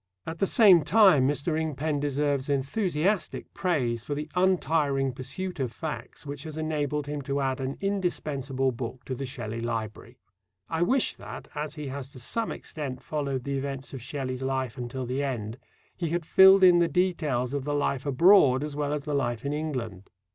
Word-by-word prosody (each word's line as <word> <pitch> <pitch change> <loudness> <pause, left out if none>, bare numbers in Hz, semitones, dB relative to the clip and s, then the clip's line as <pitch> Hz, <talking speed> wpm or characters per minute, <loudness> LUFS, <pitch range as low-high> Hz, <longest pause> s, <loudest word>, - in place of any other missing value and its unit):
At 160 0 -6
the 195 - +2
same 195 -7 +7
time, 150 -5 +5
Mr. 145 +3 0
Ingpen 155 -1 -1
deserves 145 -1 0
enthusiastic 170 +6 -1
praise 125 - 0
for 145 - -3
the 150 +1 -5
untiring 155 -7 +2
pursuit 150 +8 -5
of 130 -3 -1
facts 155 +2 -6
which 145 0 -5
has 155 0 -7
enabled 150 -2 -1
him 145 0 -4
to 140 +1 -2
add 135 -1 -1
an 130 +1 -3
indispensable 150 -9 -1
book 120 +1 -6
to 130 - -4
the 135 +1 -4
Shelley 115 -3 -5
library. 115 -2 -4 0.5
I 165 0 -2
wish 255 +9 +2
that, - - -9
as 150 0 -4
he 150 -3 -5
has 135 0 -6
to 130 - -10
some 225 - -1
extent 135 -5 -6
followed 140 -4 -2
the 140 0 -2
events 135 0 -5
of 135 - -6
Shelley's 130 0 -4
life 130 -2 -2
until 125 +1 -5
the 130 +3 -2
end, 120 -4 -3 0.4
he 170 -3 -2
had 170 0 -2
filled 190 +2 +7
in 180 -2 +7
the 170 - +4
details 155 -7 0
of 140 -2 -2
the 145 +1 -1
life 140 -2 0
abroad 140 -2 +5
as 150 -1 -5
well 145 0 -1
as 150 -1 -3
the 150 0 -3
life 120 -3 -1
in 140 - -1
England. 125 -11 -4
140 Hz, 185 wpm, -27 LUFS, 130-160 Hz, 0.5 s, same